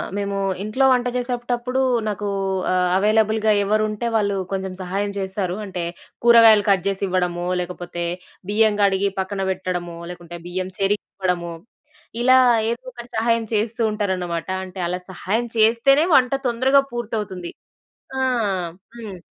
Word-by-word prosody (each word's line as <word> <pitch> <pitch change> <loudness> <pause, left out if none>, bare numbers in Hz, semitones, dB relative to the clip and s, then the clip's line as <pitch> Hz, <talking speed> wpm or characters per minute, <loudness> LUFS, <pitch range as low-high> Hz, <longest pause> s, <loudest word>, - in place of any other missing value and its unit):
మేము 200 -1 -2 0.3
ఇంట్లో 235 +6 +1
వంట 250 -1 +2
జేసేటప్పుడు 245 0 -2 0.3
నాకూ 205 0 -3 0.4
ఆహ్, 180 -1 +2
అవైలబుల్‌గా 215 +1 +3
ఎవరుంటే 215 +2 0
వాళ్ళు 205 -2 +1 0.2
కొంచెం 190 -1 -3
సహాయం 195 +3 -2
చేస్తారు. 190 -1 -2
అంటే, 185 -3 -4 0.4
కూరగాయలు 230 -3 +7
కట్ 190 -3 +3
జేసివ్వడమో, 185 -3 -1 0.2
లేకపోతే 175 -1 -5 0.5
బియ్యం 215 0 +3
గడిగి 200 0 +3
పక్కన 195 +1 -2
పెట్టడమో, 175 -2 -3
లేకుంటే 175 -1 -9
బియ్యం 185 +1 -3
చెరిగివ్వడమో, 185 -3 -1 0.7
ఇలా 255 +1 +6 0.3
ఏదోకటి 240 0 -6
సహాయం 230 0 +1
చేస్తూ 220 +2 -1
ఉంటారనమాట. 185 -5 -2 0.2
అంటే, 185 0 -10
అలా 180 +1 -2
సహాయం 220 +6 -2
చేస్తేనే 235 +7 +4
వంట 255 -2 +4 0.2
తొందరగా 265 +4 +3
పూర్తవుతుంది. 210 -7 -4 0.7
ఆ! - - 0 0.8
హ్మ్. 215 -5 -7
205 Hz, 120 wpm, -22 LUFS, 185-230 Hz, 0.8 s, కూరగాయలు